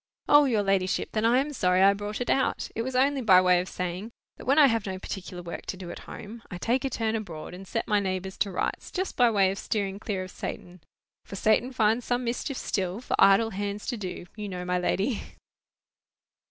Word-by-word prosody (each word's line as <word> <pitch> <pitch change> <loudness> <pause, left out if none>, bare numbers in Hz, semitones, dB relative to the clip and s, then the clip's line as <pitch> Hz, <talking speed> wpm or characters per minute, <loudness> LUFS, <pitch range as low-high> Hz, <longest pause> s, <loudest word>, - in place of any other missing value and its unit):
"O, 290 0 +7
your 225 -6 +2
ladyship! 195 -1 0
then 215 0 0
I 235 +2 +5
am 290 +3 0
sorry 185 -6 +3
I 200 +1 +7
brought 205 +3 -5
it 245 - -2
out. 265 - 0
It 225 - -2
was 255 +2 -4
only 270 +1 +3
by 190 -6 +7
way 180 -1 +4
of 185 - -7
saying, 180 +4 -4 0.3
that - - -11
when 275 +3 +3
I 300 - +9
have 225 -6 +1
no 190 -1 -3
particular 185 -2 -7
work 170 - -7
to 190 - -4
do 180 -2 -7
at - - -8
home, 225 +2 -9
I 180 - -6
take 240 +8 0
a 270 - 0
turn 225 -2 -1
abroad, 180 -8 -5
and 190 +2 -10
set 225 - -2
my 210 -1 +3
neighbours 190 -1 -3
to 205 - +1
rights, 185 - -3
just 375 +1 -3
by 245 -1 +5
way 195 -4 +3
of 195 - -5
steering 200 -2 -2
clear 200 -3 -3
of 185 - -9
Satan. 180 0 -7 0.4
For - - -9
Satan 220 +5 +2
finds 225 -1 +2
some 245 0 0
mischief 245 +3 -3
still 190 0 -2
For 250 - -2
idle 210 +3 +6
hands 205 +1 -4
to 250 - -2
do, 185 -5 -6
you 210 -1 -5
know, 180 -1 -5
my 180 0 0
lady." 200 +6 0
205 Hz, 230 wpm, -27 LUFS, 185-235 Hz, 0.4 s, I